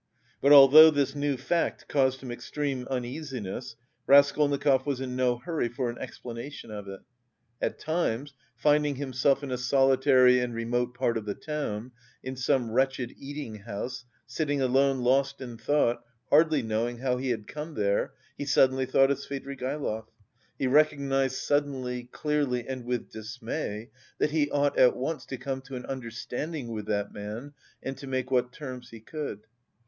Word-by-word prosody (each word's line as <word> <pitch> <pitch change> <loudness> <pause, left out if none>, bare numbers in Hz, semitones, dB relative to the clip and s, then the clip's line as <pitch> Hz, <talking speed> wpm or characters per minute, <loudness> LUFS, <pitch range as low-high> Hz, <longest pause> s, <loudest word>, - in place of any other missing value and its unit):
But 140 - +4
although 145 +3 +10
this 145 -3 +1
new 145 -1 -1
fact 165 +7 -1
caused 130 -2 +1
him 125 - -6
extreme 130 +1 -3
uneasiness, 125 -3 -5 0.3
Raskolnikov 140 -1 +4
was 140 -3 -1
in 130 -1 -4
no 125 -1 +2
hurry 155 -2 -2
for 120 0 -2
an 120 - -11
explanation 120 0 -8
of 105 -2 -7
it. 95 0 -8 0.6
At - - -1
times, 145 -5 -2 0.2
finding 150 -1 +2
himself 135 +1 +1
in 135 - -5
a 125 - -2
solitary 130 0 +5
and 125 -1 -2
remote 120 +1 -1
part 120 -2 0
of 105 - -10
the 100 - -3
town, 130 -7 -4 0.3
in 130 +1 -5
some 130 -2 0
wretched 130 0 0
eating 140 -5 -6
house, 120 +4 -6 0.2
sitting 145 -3 -1
alone 135 0 +2
lost 135 +2 +2
in 125 -3 -7
thought, 120 -2 +1 0.3
hardly 155 -2 +5
knowing 115 +2 -1
how 125 0 0
he 130 +1 -2
had 110 -3 -2
come 150 +4 -7
there, 100 -1 0 0.3
he 145 - -3
suddenly 130 -1 +3
thought 135 +1 +4
of 140 - 0
Svidrigaïlov. 135 -4 -4 0.5
He - - -1
recognised 135 -1 +2
suddenly, 130 -4 -1
clearly, 145 -5 -1
and 130 -2 -5
with 125 -1 -3
dismay 110 0 -5 0.3
that 150 - +1
he 150 -2 +1
ought 145 0 +1
at 125 - +6
once 150 +5 -3
to 130 - -5
come 130 +1 -4
to 135 0 -9
an 125 - -6
understanding 130 +3 -5
with 105 -2 -5
that 100 -1 -1
man 110 +8 -7 0.3
and 135 - -4
to 140 - -8
make 130 -1 -2
what 125 -1 +2
terms 130 -3 -8
he 115 - -11
could. 140 -2 -6
130 Hz, 165 wpm, -28 LUFS, 120-140 Hz, 0.6 s, although